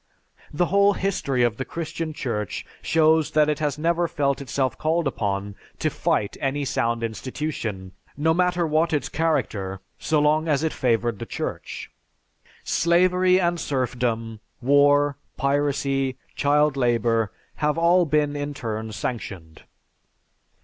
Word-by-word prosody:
The 175 Hz, +4 st, +1 dB
whole 200 Hz, +2 st, +4 dB
history 140 Hz, -11 st, 0 dB
of 115 Hz, -2 st, +1 dB
the 130 Hz, -, -2 dB
Christian 165 Hz, +3 st, -4 dB
Church 115 Hz, -9 st, -3 dB, 0.2 s
shows 160 Hz, -1 st, +3 dB
that 150 Hz, -1 st, +4 dB
it 150 Hz, 0 st, 0 dB
has 150 Hz, -2 st, -1 dB
never 170 Hz, +2 st, +1 dB
felt 140 Hz, -4 st, 0 dB
itself 130 Hz, -1 st, -1 dB
called 165 Hz, +2 st, +1 dB
upon 100 Hz, -5 st, -2 dB, 0.2 s
to -, -, 0 dB
fight 100 Hz, -, 0 dB
any 140 Hz, +1 st, -1 dB
sound 115 Hz, -2 st, 0 dB
institution, 115 Hz, -5 st, -4 dB, 0.3 s
no 160 Hz, +2 st, +3 dB
matter 180 Hz, 0 st, +1 dB
what 160 Hz, +1 st, +1 dB
its 150 Hz, -, 0 dB
character, 100 Hz, -12 st, -1 dB, 0.2 s
so 155 Hz, -, +1 dB
long 155 Hz, +2 st, +2 dB
as 150 Hz, -1 st, +1 dB
it 160 Hz, -, 0 dB
favored 120 Hz, -4 st, 0 dB
the -, -, -6 dB
Church. -, -, -5 dB, 0.7 s
Slavery 180 Hz, +2 st, +3 dB
and 175 Hz, -1 st, +1 dB
serfdom, 120 Hz, -5 st, -2 dB, 0.2 s
war, 145 Hz, +2 st, +4 dB, 0.2 s
piracy, 140 Hz, -1 st, 0 dB, 0.2 s
child 150 Hz, 0 st, +3 dB
labor, 115 Hz, -4 st, +1 dB, 0.3 s
have 150 Hz, +1 st, 0 dB
all 170 Hz, +2 st, +4 dB
been 150 Hz, -1 st, +1 dB
in 145 Hz, 0 st, -4 dB
turn 110 Hz, -2 st, -4 dB
sanctioned." 95 Hz, -8 st, -6 dB
145 Hz, 135 wpm, -24 LUFS, 120-160 Hz, 0.7 s, whole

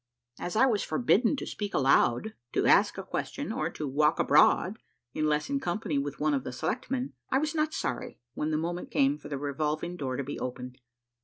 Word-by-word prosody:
As 175 Hz, -, -4 dB
I 245 Hz, -, +6 dB
was 225 Hz, -6 st, +2 dB
forbidden 240 Hz, +1 st, +2 dB
to -, -, -5 dB
speak 205 Hz, -2 st, -4 dB
aloud, 135 Hz, -, +3 dB, 0.2 s
to -, -, +1 dB
ask -, -, +5 dB
a -, -, -4 dB
question, -, -, -4 dB
or -, -, -1 dB
to 150 Hz, -, -5 dB
walk 150 Hz, +3 st, +2 dB
abroad 195 Hz, +5 st, +4 dB, 0.3 s
unless 150 Hz, -1 st, 0 dB
in 280 Hz, 0 st, 0 dB
company 175 Hz, -, -1 dB
with 140 Hz, +1 st, -4 dB
one 150 Hz, 0 st, +2 dB
of 135 Hz, -2 st, 0 dB
the -, -, -5 dB
selectmen, 250 Hz, -, -3 dB, 0.2 s
I 265 Hz, -, +3 dB
was 300 Hz, +2 st, 0 dB
not 310 Hz, -1 st, +1 dB
sorry 125 Hz, -, -4 dB
when 150 Hz, -, -2 dB
the 155 Hz, -, +1 dB
moment 175 Hz, +3 st, -3 dB
came 140 Hz, +2 st, +2 dB
for 145 Hz, -, -10 dB
the 140 Hz, -, -3 dB
revolving 150 Hz, +5 st, -2 dB
door 130 Hz, -4 st, -3 dB
to 140 Hz, -, -2 dB
be 145 Hz, +2 st, -5 dB
opened. 125 Hz, 0 st, -6 dB
155 Hz, 205 wpm, -29 LUFS, 140-220 Hz, 0.3 s, I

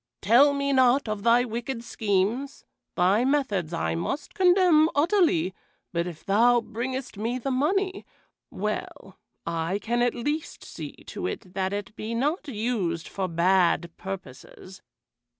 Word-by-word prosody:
"Tell 245 Hz, +8 st, +6 dB
me 280 Hz, 0 st, 0 dB
not 260 Hz, 0 st, +4 dB
of 215 Hz, -1 st, -3 dB
thy 235 Hz, +3 st, +4 dB
wicked 235 Hz, +1 st, -4 dB
schemes! 220 Hz, +6 st, -1 dB, 0.3 s
Thy 190 Hz, +6 st, +3 dB
methods 255 Hz, -, 0 dB
I 165 Hz, -2 st, -1 dB
must 270 Hz, -, -4 dB
condemn 360 Hz, -5 st, +5 dB
utterly, 295 Hz, -, +2 dB, 0.4 s
but 170 Hz, 0 st, 0 dB
if 170 Hz, -3 st, -9 dB
thou 235 Hz, +5 st, +4 dB
bringest 240 Hz, +2 st, -5 dB
me 230 Hz, +4 st, -2 dB
the 270 Hz, +2 st, -3 dB
money, 375 Hz, +9 st, 0 dB, 0.5 s
well, -, -, -5 dB, 0.3 s
I 170 Hz, +3 st, -1 dB
can 235 Hz, +3 st, -1 dB
at 245 Hz, -1 st, +1 dB
least 295 Hz, +6 st, -3 dB
see -, -, -8 dB
to -, -, -4 dB
it 185 Hz, -, -7 dB
that 190 Hz, -1 st, -1 dB
it 205 Hz, +1 st, -5 dB
be 220 Hz, +2 st, -4 dB
not 295 Hz, +7 st, -1 dB
used 210 Hz, -, -2 dB
for 190 Hz, -1 st, -3 dB
bad 170 Hz, -1 st, +2 dB
purposes. 190 Hz, +1 st, -9 dB
230 Hz, 140 wpm, -26 LUFS, 190-275 Hz, 0.5 s, Tell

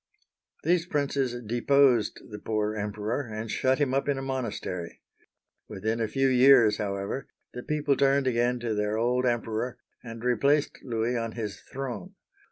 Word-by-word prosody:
These 175 Hz, -1 st, +2 dB
princes 140 Hz, -5 st, -1 dB
deposed 120 Hz, 0 st, +3 dB
the 105 Hz, -, -7 dB
poor 105 Hz, 0 st, -1 dB
Emperor 105 Hz, +4 st, -2 dB
and 110 Hz, +1 st, -5 dB
shut 130 Hz, 0 st, +2 dB
him 140 Hz, -3 st, 0 dB
up 140 Hz, +1 st, 0 dB
in 140 Hz, -, +1 dB
a -, -, -3 dB
monastery. 115 Hz, -9 st, -4 dB, 0.7 s
Within 110 Hz, +3 st, -2 dB
a 110 Hz, -, +1 dB
few 135 Hz, +4 st, +1 dB
years, 125 Hz, -4 st, +6 dB
however, 100 Hz, +4 st, -3 dB, 0.3 s
the 125 Hz, -, -6 dB
people 150 Hz, 0 st, 0 dB
turned 140 Hz, 0 st, +3 dB
again 120 Hz, 0 st, +1 dB
to 115 Hz, -2 st, -1 dB
their 105 Hz, +1 st, -1 dB
old 125 Hz, +2 st, +1 dB
Emperor, 120 Hz, 0 st, -1 dB, 0.3 s
and 115 Hz, -1 st, -8 dB
replaced 140 Hz, +5 st, +2 dB
Louis 115 Hz, 0 st, -1 dB
on 115 Hz, -1 st, -2 dB
his 110 Hz, -3 st, -5 dB
throne. 135 Hz, -, -6 dB
120 Hz, 155 wpm, -27 LUFS, 110-135 Hz, 0.7 s, years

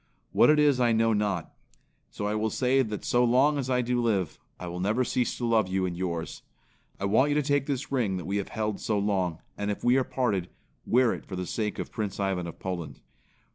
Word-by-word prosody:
What -, -, +5 dB
it 150 Hz, -, +6 dB
is 145 Hz, -3 st, +4 dB
I 120 Hz, -2 st, +3 dB
know 115 Hz, 0 st, +3 dB
not. 100 Hz, -5 st, -1 dB, 0.6 s
So 105 Hz, -, -5 dB
I 105 Hz, -, 0 dB
will 110 Hz, +1 st, 0 dB
say 130 Hz, +4 st, +2 dB
that 105 Hz, -4 st, -4 dB
so 120 Hz, 0 st, +3 dB
long 135 Hz, +5 st, +3 dB
as 130 Hz, -1 st, -3 dB
I 125 Hz, -1 st, +2 dB
do 120 Hz, 0 st, 0 dB
live, 100 Hz, -8 st, 0 dB, 0.2 s
I 90 Hz, -, -6 dB
will 90 Hz, 0 st, -5 dB
never 105 Hz, +7 st, +1 dB
cease 125 Hz, -1 st, -1 dB
to 120 Hz, -, -2 dB
love 110 Hz, -4 st, +3 dB
you 95 Hz, 0 st, 0 dB
and 90 Hz, -1 st, -3 dB
yours. 85 Hz, -2 st, -4 dB, 0.6 s
I 100 Hz, -, -2 dB
want 115 Hz, +8 st, +3 dB
you 145 Hz, -, +1 dB
to 150 Hz, -, +2 dB
take 145 Hz, 0 st, +1 dB
this 140 Hz, -2 st, -3 dB
ring 115 Hz, -9 st, 0 dB
that 90 Hz, -, -6 dB
we 100 Hz, +2 st, -1 dB
have 100 Hz, -, -2 dB
held 105 Hz, -2 st, -2 dB
so 105 Hz, -, -1 dB
long 95 Hz, -5 st, -1 dB, 0.2 s
and 105 Hz, 0 st, -1 dB
if 105 Hz, -, -3 dB
we 125 Hz, +2 st, +4 dB
are 135 Hz, -, +3 dB
parted, 105 Hz, -10 st, -1 dB, 0.4 s
wear 125 Hz, 0 st, +4 dB
it -, -, -8 dB
for 95 Hz, -, -6 dB
the 90 Hz, 0 st, -3 dB
sake 105 Hz, +2 st, -2 dB
of -, -, -5 dB
Prince 105 Hz, -3 st, -4 dB
Ivan 95 Hz, -3 st, -1 dB
of 85 Hz, -, -8 dB
Poland." 90 Hz, -3 st, -5 dB
110 Hz, 240 wpm, -27 LUFS, 95-125 Hz, 0.6 s, it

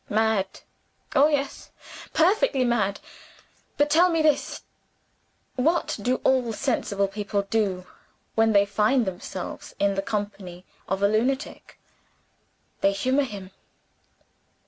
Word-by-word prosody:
Mad? 215 Hz, -3 st, 0 dB, 0.5 s
Oh, 280 Hz, +2 st, +6 dB
yes 285 Hz, -2 st, -2 dB, 0.4 s
perfectly 350 Hz, -, +3 dB
mad. 210 Hz, -5 st, 0 dB, 0.8 s
But, 290 Hz, +1 st, +2 dB
tell 345 Hz, +4 st, +5 dB
me 330 Hz, -2 st, +1 dB
this: 305 Hz, -2 st, +1 dB, 0.9 s
What 310 Hz, +3 st, +1 dB
do 250 Hz, +5 st, +1 dB
all 255 Hz, -3 st, +2 dB
sensible 205 Hz, -5 st, 0 dB
people 200 Hz, 0 st, -2 dB
do 195 Hz, -3 st, -1 dB, 0.5 s
when 225 Hz, 0 st, +3 dB
they 200 Hz, -1 st, +5 dB
find 215 Hz, +5 st, +2 dB
themselves 185 Hz, 0 st, -6 dB
in 200 Hz, 0 st, +2 dB
the 195 Hz, -, -1 dB
company 200 Hz, -3 st, -5 dB, 0.2 s
of 195 Hz, +1 st, -2 dB
a -, -, +6 dB
lunatic? 245 Hz, +7 st, -2 dB, 1.0 s
They 195 Hz, -, +3 dB
humor 260 Hz, +8 st, +1 dB
him. 195 Hz, -5 st, -8 dB
220 Hz, 115 wpm, -25 LUFS, 200-270 Hz, 1.0 s, Oh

